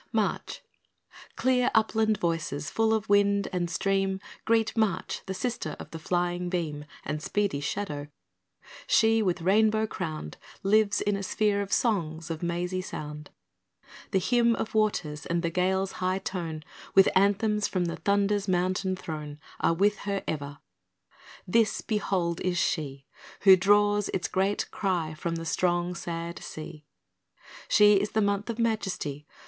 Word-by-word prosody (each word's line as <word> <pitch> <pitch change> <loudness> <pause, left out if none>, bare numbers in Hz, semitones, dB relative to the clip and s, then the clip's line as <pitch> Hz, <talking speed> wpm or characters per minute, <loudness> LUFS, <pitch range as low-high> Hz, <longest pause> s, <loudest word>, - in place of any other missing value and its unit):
March - - -1 0.7
Clear 255 -1 +2
upland 220 -1 +3
voices, 165 -5 -2
full 225 0 +2
of 220 -1 0
wind 200 0 +3
and 175 -1 -1
stream, 195 +1 0 0.3
Greet 225 -1 +2
March, 220 -3 0
the 190 - -2
sister 240 +5 -3
of - - -9
the 165 - -6
flying 175 +1 -1
beam 155 -5 -3 0.2
And 150 0 -3
speedy 200 -5 0
shadow. 145 -2 -3 0.8
She, 225 0 +4
with 180 -4 0
rainbow 215 +3 +3
crowned, 155 - -5 0.3
Lives 205 +1 +3
in 205 0 +1
a 200 - -3
sphere 200 +1 +1
of 200 - -5
songs 165 -8 0
of 160 - -5
mazy 175 +2 -2
sound. 150 -4 -7 0.8
The - - +1
hymn 235 +4 +3
of 220 - -4
waters 180 -9 0
and 170 +1 0
the 170 - 0
gale's 190 +2 +1
high 185 +1 -1
tone, 170 -5 -4 0.3
With 195 0 +7
anthems 205 +2 +3
from 185 -2 -1
the 170 - -3
thunder's 200 0 +1
mountain 185 +1 0
throne, 150 -4 -6 0.2
Are 165 - +2
with 205 +4 +2
her 200 -1 -3
ever. 145 -2 -4 0.9
This, 225 +4 +2
behold, 185 -5 -1
is 180 -1 0
she 140 -6 -1 0.4
Who 190 -1 +9
draws 205 +2 +3
its 180 - -1
great 195 +2 0
cry 175 -6 -1
from 165 +2 -3
the 165 0 -5
strong, 175 +1 0
sad 170 -1 -5
sea; 155 -1 -9 0.8
She 210 -1 +6
is 205 +2 -1
the 220 - +2
month 200 +2 0
of 230 - -3
majesty. 195 -11 -2
190 Hz, 150 wpm, -28 LUFS, 165-205 Hz, 0.9 s, Who